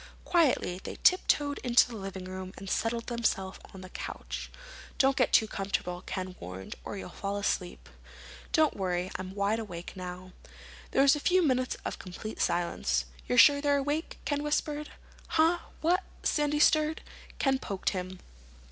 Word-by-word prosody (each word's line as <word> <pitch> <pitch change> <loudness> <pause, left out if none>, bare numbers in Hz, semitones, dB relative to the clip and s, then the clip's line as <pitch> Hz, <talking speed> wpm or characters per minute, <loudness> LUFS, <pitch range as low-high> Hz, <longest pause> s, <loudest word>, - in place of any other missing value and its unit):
Quietly 265 - +2
they - - -6
tiptoed 290 -5 +3
into 245 0 +5
the 240 - -8
living 195 -2 -6
room 185 0 -6
and 195 - -8
settled 230 +4 -1
themselves 220 -6 -1
on 190 - -10
the 185 - -10
couch. - - -6 0.5
"Don't 270 0 +4
get 255 - +2
too 220 - +5
comfortable," 195 -3 -2
Ken 185 -1 -4
warned, 90 +2 -7
"or - - -5
you'll 185 - -7
fall 200 +2 -3
asleep." 180 - -2 0.6
"Don't 310 -1 +3
worry. 180 -1 -1
I'm 185 +1 -7
wide 205 +2 +1
awake 180 -6 -7
now." 185 0 -7 0.6
There 270 - +4
was 280 +1 +6
a - - -3
few 360 +3 +3
minutes 255 -2 +1
of - - -4
complete 205 +4 -6
silence. 65 - +1 0.2
"You're 125 - +1
sure 285 -1 +8
you're 285 0 +2
awake?" 290 +4 -2
Ken 290 +1 0
whispered. 295 0 -1 0.5
"Huh? 330 +2 +4 0.2
What?" 355 +4 +3 0.2
Sandy 295 0 +1
stirred. 310 +1 +4 0.4
Ken 270 -1 +2
poked 195 -6 -2
him. 185 -1 -4
215 Hz, 160 wpm, -30 LUFS, 185-290 Hz, 0.6 s, sure